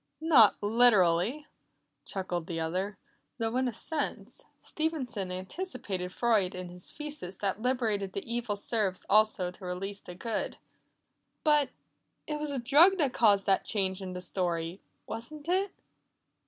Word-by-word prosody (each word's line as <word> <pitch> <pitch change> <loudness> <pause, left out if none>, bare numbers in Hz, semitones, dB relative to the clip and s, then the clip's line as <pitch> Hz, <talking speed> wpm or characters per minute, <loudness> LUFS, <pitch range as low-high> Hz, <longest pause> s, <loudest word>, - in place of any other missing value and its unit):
"Not 290 -10 +6
literally," 215 - +4 0.6
chuckled 180 -3 -3
the 165 -1 -3
other, 185 +5 -2 0.4
"though 225 0 -1
in 260 0 +2
a - - 0
sense, 245 -5 -4 0.2
Stevenson 260 - -3
anticipated 190 - -4
Freud 210 -5 +2
in 180 -1 -6
his 180 0 -8
thesis 295 -12 -6
that 200 +1 -2
liberating 225 -6 0
the 195 +1 -5
evil 235 -2 -2
serves 200 -2 -1
also 210 -4 +3
to 185 - -16
release 195 +3 -4
the 180 - -10
good." 225 +3 -3 0.9
"But 295 -3 +4 0.6
It 300 -1 -3
was 300 0 -3
a 280 - -2
drug 295 +10 +6
that 285 -7 +1
caused 200 -4 +4
that 195 -1 +3
change 190 -2 -1
in 185 -1 -5
the 180 - -5
story, 175 -1 -2 0.2
wasn't 290 +7 -7
it?" 380 +3 +1
210 Hz, 140 wpm, -30 LUFS, 185-260 Hz, 0.9 s, Not